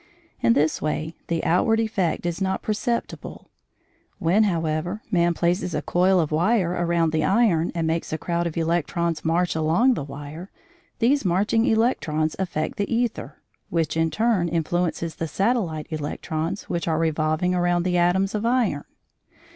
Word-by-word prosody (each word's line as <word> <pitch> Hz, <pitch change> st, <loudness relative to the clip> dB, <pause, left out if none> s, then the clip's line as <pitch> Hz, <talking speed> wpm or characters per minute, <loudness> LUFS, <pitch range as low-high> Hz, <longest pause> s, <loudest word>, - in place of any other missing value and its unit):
In 115 Hz, -, +4 dB
this 150 Hz, +4 st, +1 dB
way 155 Hz, +1 st, -2 dB
the 165 Hz, -1 st, -1 dB
outward 225 Hz, +6 st, +2 dB
effect 200 Hz, -7 st, -1 dB
is 175 Hz, +2 st, -2 dB
not 190 Hz, 0 st, -1 dB
perceptible. 225 Hz, +2 st, -3 dB, 0.7 s
When, 200 Hz, +4 st, +3 dB
however, 170 Hz, +2 st, -1 dB
man 175 Hz, -2 st, +2 dB
places 175 Hz, 0 st, 0 dB
a -, -, -2 dB
coil 185 Hz, +1 st, +3 dB
of 160 Hz, -3 st, 0 dB
wire 175 Hz, +3 st, +2 dB
around 170 Hz, -2 st, +1 dB
the 155 Hz, -1 st, 0 dB
iron, 195 Hz, -7 st, +2 dB
and 165 Hz, -1 st, 0 dB
makes 165 Hz, +1 st, -1 dB
a 155 Hz, -, -1 dB
crowd 170 Hz, +1 st, -1 dB
of 165 Hz, -, -6 dB
electrons 170 Hz, 0 st, 0 dB
march 170 Hz, +2 st, +1 dB
along 165 Hz, +12 st, +3 dB
the 150 Hz, -, -3 dB
wire, 145 Hz, +6 st, -8 dB, 0.5 s
these 275 Hz, +5 st, +2 dB
marching 205 Hz, +5 st, +2 dB
electrons 160 Hz, -9 st, +1 dB
affect 165 Hz, -4 st, -2 dB
the 200 Hz, -, 0 dB
æther, 235 Hz, -1 st, -1 dB, 0.4 s
which 160 Hz, -2 st, 0 dB
in 165 Hz, 0 st, +2 dB
turn 215 Hz, -4 st, +1 dB
influences 170 Hz, 0 st, -1 dB
the 165 Hz, -, -2 dB
satellite 190 Hz, -4 st, 0 dB
electrons 155 Hz, +4 st, -3 dB
which 170 Hz, 0 st, -3 dB
are 160 Hz, -1 st, +1 dB
revolving 160 Hz, +2 st, +1 dB
around 175 Hz, -1 st, +1 dB
the 180 Hz, -1 st, +1 dB
atoms 190 Hz, +3 st, +2 dB
of 210 Hz, 0 st, -2 dB
iron. 230 Hz, -, +1 dB
170 Hz, 155 wpm, -24 LUFS, 160-195 Hz, 0.7 s, In